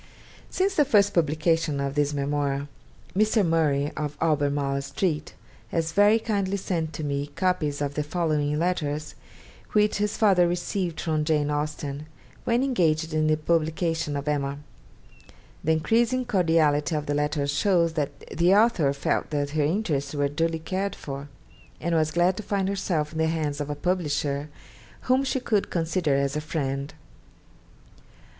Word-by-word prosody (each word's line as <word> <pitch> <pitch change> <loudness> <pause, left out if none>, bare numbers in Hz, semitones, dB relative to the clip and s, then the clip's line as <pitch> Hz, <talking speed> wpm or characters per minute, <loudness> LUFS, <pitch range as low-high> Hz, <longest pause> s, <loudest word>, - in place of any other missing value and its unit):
Since 385 +1 0
the 300 - +6
first 205 -7 +3
publication 160 -1 +1
of 140 0 -2
this 145 0 +1
memoir, 140 0 -1 0.5
Mr. 215 0 +3
Murray 150 -3 +1
of 150 -1 -4
Albemarle 145 -3 +1
Street 150 +3 -2 0.3
has 165 -1 -1
very 205 +5 +5
kindly 200 -3 -1
sent 165 -4 -2
to 155 - -5
me 140 0 -2
copies 155 -6 0
of 140 0 -2
the 150 - -1
following 150 -2 0
letters, 155 -3 -1 0.6
which 210 0 +3
his 210 0 -1
father 190 -6 +4
received 175 0 -2
from 155 -2 0
Jane 150 -1 +1
Austen, 150 0 -3 0.4
when 240 +2 +2
engaged 165 - +1
in 155 0 +2
the 155 0 +3
publication 160 -1 0
of 140 +1 -5
'Emma.' 140 -1 -1 1.1
The 160 - +3
increasing 235 +10 +1
cordiality 165 -7 +2
of 150 -1 -2
the 145 - -1
letters 145 -1 0
shows 170 0 +2
that 150 -3 -3
the 175 +4 +4
author 205 -10 +4
felt 140 - -1
that 145 -2 -1
her 155 0 0
interests 150 -4 -1
were 145 -1 +1
duly 165 +3 0
cared 190 +4 -3
for, 140 0 -7 0.5
and 170 +2 -1
was 155 -1 +2
glad 175 +3 +2
to - - -3
find 200 -2 -1
herself 175 -6 -1
in 160 - -5
the 160 - +3
hands 150 -3 -1
of 145 - -4
a 145 - -2
publisher 150 -4 -1 0.5
whom 260 +1 +2
she 265 0 0
could 215 -5 0
consider 165 -3 0
as 140 +1 0
a 150 - -1
friend. 140 -3 -3
155 Hz, 155 wpm, -26 LUFS, 145-180 Hz, 1.1 s, the